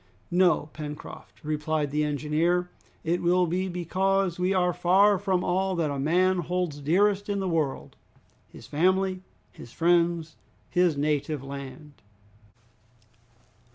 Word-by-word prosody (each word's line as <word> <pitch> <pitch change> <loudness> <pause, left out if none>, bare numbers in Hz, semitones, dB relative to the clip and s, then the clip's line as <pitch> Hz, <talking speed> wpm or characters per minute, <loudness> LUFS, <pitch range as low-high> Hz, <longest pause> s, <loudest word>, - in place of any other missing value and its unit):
"No, 175 -4 +3
Pencroft," 150 -1 -9
replied 150 -1 -1
the 150 +1 +1
engineer, 155 +4 0 0.3
"it 170 +2 0
will 180 +1 +3
be 180 +3 -1
because 185 +1 0
we 180 +1 +1
are 180 -2 +2
far 195 +3 +4
from 185 -1 0
all 190 +1 0
that 160 -4 0
a 140 - -3
man 180 +6 +2
holds 175 -3 -2
dearest 200 +7 +1
in 200 0 -1
the 190 - -2
world, 160 -6 -2 0.5
his - - -13
family, 185 +4 +1 0.3
his 120 - -13
friends, 170 -1 +1 0.3
his 175 -4 +2
native 145 -1 -1
land!" 140 -1 -9
175 Hz, 125 wpm, -26 LUFS, 150-185 Hz, 0.5 s, far